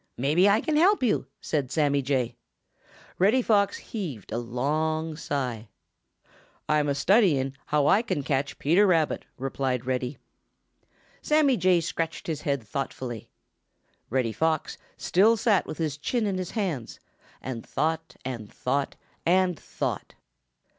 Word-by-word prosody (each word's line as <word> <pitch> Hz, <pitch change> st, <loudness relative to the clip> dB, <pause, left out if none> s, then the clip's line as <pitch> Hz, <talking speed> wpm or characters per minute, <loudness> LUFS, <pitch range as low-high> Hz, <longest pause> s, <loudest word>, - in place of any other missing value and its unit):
Perhaps 150 Hz, +9 st, +3 dB
I 205 Hz, +3 st, +4 dB
can 305 Hz, -1 st, 0 dB
help 370 Hz, 0 st, +4 dB
you," 225 Hz, -4 st, +1 dB
said 145 Hz, -5 st, -1 dB
Sammy 145 Hz, -3 st, +2 dB
Jay. 125 Hz, -3 st, -1 dB, 0.8 s
Reddy 220 Hz, +8 st, +4 dB
Fox 200 Hz, -3 st, +3 dB
heaved 155 Hz, -, -6 dB
a 115 Hz, -, -1 dB
long 155 Hz, +6 st, -1 dB
sigh. 125 Hz, -8 st, -3 dB, 1.0 s
"I'm 150 Hz, -1 st, +2 dB
a 140 Hz, -, +1 dB
studying 145 Hz, -, +3 dB
how 150 Hz, -1 st, +2 dB
I 200 Hz, -, +5 dB
can 230 Hz, -, -2 dB
catch 140 Hz, 0 st, -1 dB
Peter 180 Hz, +8 st, +4 dB
Rabbit," 165 Hz, -4 st, +1 dB
replied 130 Hz, -1 st, -2 dB
Reddy. 130 Hz, +1 st, -2 dB, 1.0 s
Sammy 300 Hz, -3 st, +3 dB
Jay 185 Hz, -5 st, +3 dB
scratched 165 Hz, +2 st, -3 dB
his 160 Hz, -5 st, -3 dB
head 140 Hz, -4 st, -1 dB
thoughtfully. 120 Hz, 0 st, -5 dB, 0.8 s
Reddy 125 Hz, -2 st, 0 dB
Fox 160 Hz, +2 st, 0 dB, 0.2 s
still 215 Hz, +5 st, +4 dB
sat 210 Hz, -3 st, +2 dB
with -, -, -6 dB
his 150 Hz, -3 st, -2 dB
chin 230 Hz, -, 0 dB
in 195 Hz, -2 st, -1 dB
his 185 Hz, -, -3 dB
hands 165 Hz, -, -3 dB, 0.4 s
and 120 Hz, -3 st, -5 dB
thought 160 Hz, +1 st, -2 dB
and 115 Hz, -5 st, -5 dB
thought 140 Hz, +2 st, -1 dB, 0.3 s
and 180 Hz, -2 st, +2 dB
thought. -, -, -4 dB
150 Hz, 135 wpm, -26 LUFS, 130-185 Hz, 1.0 s, I